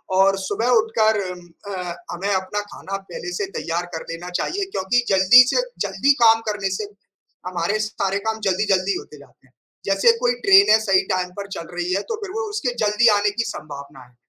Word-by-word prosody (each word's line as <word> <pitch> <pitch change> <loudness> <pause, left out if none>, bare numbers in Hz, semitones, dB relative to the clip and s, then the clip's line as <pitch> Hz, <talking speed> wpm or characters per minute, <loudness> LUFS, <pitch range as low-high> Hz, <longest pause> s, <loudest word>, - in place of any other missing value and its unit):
और 195 +1 +4
सुबह 225 +5 -2
उठकर 220 -1 +1 0.2
म 175 -1 -15 0.2
अ, 180 -2 -5 0.2
हमें 195 +4 -3
अपना 190 +2 -2
खाना 195 -1 -7
पहले 175 +1 -6
से 200 +2 -2
तैयार 170 +3 -3
कर 160 - -4
लेना 175 +2 -7
चाहिए 395 +2 -2
क्योंकि 240 +6 0
जल्दी 195 +6 +7
से - - +3 0.3
जल्दी 195 +9 +2
काम 225 0 +6
करने 205 -2 -2
से 215 - -4 0.6
हमारे 180 +4 -1
सारे 200 -2 -2
काम 220 0 -1
जल्दी-जल्दी 190 -1 +1
होते 150 - -11
जाते 140 -1 -20
हैं। 130 - -33 0.3
जैसे 195 +4 +4
कोई 245 0 +2
ट्रेन 390 - +7
है 220 - +6
सही 195 -3 +3
टाइम 180 -1 -1
पर 200 - -6
चल 165 - -7
रही 175 +1 -1
है 195 - 0
तो - - 0
फिर 385 - -6
वो 445 0 -4
उसके 295 - -2
जल्दी 210 +3 +3
आने 205 0 +1
की 230 - +2
सँभावना 140 -2 -10
है। 125 - -28
195 Hz, 195 wpm, -21 LUFS, 180-220 Hz, 0.6 s, जल्दी